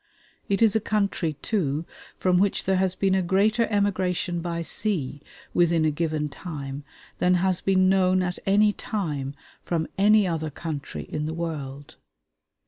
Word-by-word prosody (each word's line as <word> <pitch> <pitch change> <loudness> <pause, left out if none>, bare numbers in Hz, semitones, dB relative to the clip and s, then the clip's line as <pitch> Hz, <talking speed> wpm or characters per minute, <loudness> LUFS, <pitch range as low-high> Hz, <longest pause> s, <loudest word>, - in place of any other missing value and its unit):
It 200 +3 +2
is 220 -2 +4
a - - +4
country, 200 -7 0
too, 160 -7 0 0.3
from 180 -1 +2
which 200 0 +1
there 190 0 +1
has 185 -1 +1
been 195 -1 +1
a 190 - +3
greater 210 +6 +2
emigration 185 -4 0
by 170 -1 -3
sea 160 -8 -2 0.3
within 170 -2 +3
a 155 - +3
given 155 -1 -1
time 145 -3 -7 0.4
than 180 0 +4
has 185 0 +1
been 185 -1 +3
known 185 -1 +3
at 180 0 -3
any 205 +2 +4
time 150 - -3 0.3
from 165 -2 -1
any 210 0 +5
other 160 -2 -2
country 150 -1 -5
in 150 0 -4
the 160 - -4
world. 145 -4 -5
180 Hz, 155 wpm, -25 LUFS, 155-195 Hz, 0.4 s, any